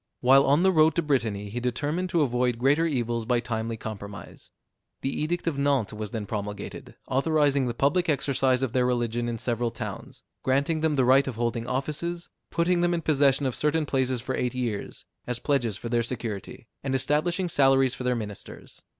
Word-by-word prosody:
While 135 Hz, +2 st, +6 dB
on 145 Hz, +5 st, +4 dB
the 190 Hz, -, +5 dB
road 155 Hz, -3 st, +4 dB
to 170 Hz, -, +1 dB
Brittany, 110 Hz, -8 st, -1 dB
he 120 Hz, -, -3 dB
determined 145 Hz, +9 st, -2 dB
to 170 Hz, -3 st, +2 dB
avoid 125 Hz, -2 st, 0 dB
greater 145 Hz, +7 st, +3 dB
evils 120 Hz, -5 st, -1 dB
by 120 Hz, +1 st, +1 dB
timely 115 Hz, -1 st, -3 dB
compromise. 105 Hz, -2 st, -8 dB, 0.5 s
The 135 Hz, -, -2 dB
edict 170 Hz, +3 st, -2 dB
of 155 Hz, -5 st, -1 dB
Nantes 140 Hz, -7 st, +1 dB
was 105 Hz, -1 st, -5 dB
then 110 Hz, -1 st, -4 dB
promulgated, 105 Hz, -1 st, -6 dB
authorizing 140 Hz, -1 st, +2 dB
the 120 Hz, -, -3 dB
public 160 Hz, +8 st, +1 dB
exercise 135 Hz, -2 st, +1 dB
of 125 Hz, -3 st, -2 dB
their 125 Hz, -1 st, +2 dB
religion 120 Hz, -1 st, -1 dB
in 115 Hz, -, -3 dB
several 120 Hz, +1 st, 0 dB
towns, -, -, -7 dB, 0.2 s
granting 140 Hz, +5 st, +1 dB
them 155 Hz, -2 st, +1 dB
the 130 Hz, -2 st, +3 dB
right 135 Hz, +2 st, +5 dB
of 130 Hz, -, -3 dB
holding 115 Hz, 0 st, -2 dB
offices, 155 Hz, +6 st, -3 dB, 0.2 s
putting 175 Hz, +1 st, +1 dB
them 175 Hz, 0 st, +2 dB
in 165 Hz, -, -3 dB
possession 140 Hz, -2 st, +3 dB
of 130 Hz, -, 0 dB
certain 150 Hz, +1 st, +1 dB
places 130 Hz, -3 st, 0 dB
for 130 Hz, +1 st, -3 dB
eight 125 Hz, 0 st, -2 dB
years, 115 Hz, -5 st, -4 dB, 0.2 s
as 125 Hz, -1 st, -2 dB
pledges 120 Hz, -6 st, 0 dB
for 120 Hz, -, -6 dB
their 120 Hz, 0 st, +2 dB
security, 115 Hz, -3 st, -5 dB, 0.2 s
and 135 Hz, -1 st, -1 dB
establishing 170 Hz, +7 st, +1 dB
salaries 135 Hz, -4 st, +3 dB
for -, -, -6 dB
their 125 Hz, 0 st, +1 dB
ministers. 105 Hz, -3 st, -8 dB
130 Hz, 190 wpm, -26 LUFS, 120-150 Hz, 0.5 s, While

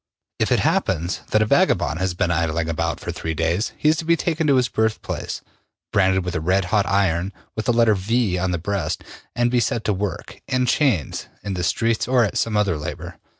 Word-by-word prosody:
If -, -, +1 dB
it -, -, +3 dB
happens 85 Hz, 0 st, 0 dB
that 110 Hz, -, +3 dB
a -, -, 0 dB
vagabond 80 Hz, -5 st, +2 dB
has 95 Hz, -2 st, -1 dB
been 85 Hz, 0 st, 0 dB
idling 85 Hz, -1 st, 0 dB
about 85 Hz, 0 st, -1 dB
for -, -, -4 dB
three 80 Hz, 0 st, -4 dB
days, 85 Hz, +7 st, 0 dB
he -, -, 0 dB
is 155 Hz, +1 st, +4 dB
to 165 Hz, -, -3 dB
be 170 Hz, +1 st, +4 dB
taken 160 Hz, -2 st, 0 dB
to 140 Hz, -, +5 dB
his 125 Hz, -2 st, +3 dB
birthplace, 110 Hz, -2 st, -2 dB, 0.5 s
branded 95 Hz, -1 st, +3 dB
with 90 Hz, -, -3 dB
a 90 Hz, -, -2 dB
redhot 95 Hz, +4 st, +1 dB
iron 95 Hz, -1 st, +1 dB, 0.2 s
with 110 Hz, -, -3 dB
the -, -, +4 dB
letter 115 Hz, -2 st, +4 dB
V 105 Hz, +1 st, 0 dB
on 95 Hz, +1 st, 0 dB
the 90 Hz, -, 0 dB
breast 90 Hz, -2 st, -2 dB, 0.3 s
and 120 Hz, 0 st, +2 dB
be 125 Hz, -, +3 dB
set 115 Hz, -1 st, 0 dB
to 105 Hz, -, +1 dB
work, 95 Hz, -2 st, -5 dB
in 130 Hz, -2 st, +1 dB
chains, 125 Hz, -, +1 dB, 0.2 s
in 100 Hz, -, -3 dB
the 90 Hz, -1 st, -3 dB
streets 115 Hz, +6 st, +1 dB
or 125 Hz, -1 st, +4 dB
at 105 Hz, -, -1 dB
some 110 Hz, -2 st, 0 dB
other 100 Hz, -7 st, +1 dB
labor. 85 Hz, +2 st, -7 dB
100 Hz, 215 wpm, -22 LUFS, 85-115 Hz, 0.5 s, to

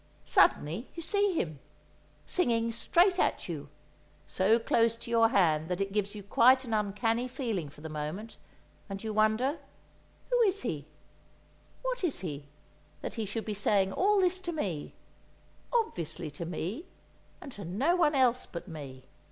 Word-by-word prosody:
Suddenly 170 Hz, -, +3 dB
you 335 Hz, -, -6 dB
see 405 Hz, +2 st, +2 dB
him, 155 Hz, -, -2 dB, 0.7 s
singing 230 Hz, -9 st, +2 dB
straight 355 Hz, -, +3 dB
at -, -, +1 dB
you, 145 Hz, -5 st, -6 dB, 0.6 s
so 200 Hz, +5 st, +3 dB
close 230 Hz, 0 st, +2 dB
to 235 Hz, 0 st, -8 dB
your 230 Hz, -1 st, +5 dB
hand 160 Hz, -6 st, +2 dB
that 180 Hz, -, -1 dB
it 195 Hz, 0 st, -2 dB
gives 205 Hz, 0 st, -1 dB
you 205 Hz, -, -7 dB
quite 255 Hz, +6 st, +5 dB
an 230 Hz, -, -4 dB
uncanny 220 Hz, +3 st, 0 dB
feeling 230 Hz, -, -3 dB
for 145 Hz, -, -16 dB
the 160 Hz, -, -6 dB
moment; 155 Hz, +9 st, -5 dB, 0.5 s
and 195 Hz, +1 st, -6 dB
you 220 Hz, -1 st, -3 dB
wonder: 220 Hz, +8 st, +2 dB, 0.7 s
Who -, -, +4 dB
is 400 Hz, -3 st, +2 dB
he—what 165 Hz, -, -8 dB
is 320 Hz, -, 0 dB
he—that 145 Hz, -4 st, -9 dB
he 220 Hz, -3 st, -3 dB
should 220 Hz, +3 st, -4 dB
be 215 Hz, -, -2 dB
saying 200 Hz, -1 st, +2 dB
all 410 Hz, +2 st, +3 dB
this 370 Hz, 0 st, +1 dB
to 350 Hz, -2 st, -3 dB
me, 190 Hz, -, -4 dB, 0.8 s
obviously 175 Hz, -, -2 dB
to 155 Hz, +4 st, -6 dB
me, 180 Hz, -, -4 dB, 0.5 s
and 275 Hz, -, -9 dB
to 205 Hz, -5 st, -9 dB
no 245 Hz, -, +1 dB
one 320 Hz, -5 st, +3 dB
else 250 Hz, -2 st, +3 dB
but 170 Hz, -, -7 dB
me? 140 Hz, -6 st, -8 dB
215 Hz, 155 wpm, -30 LUFS, 170-265 Hz, 0.8 s, your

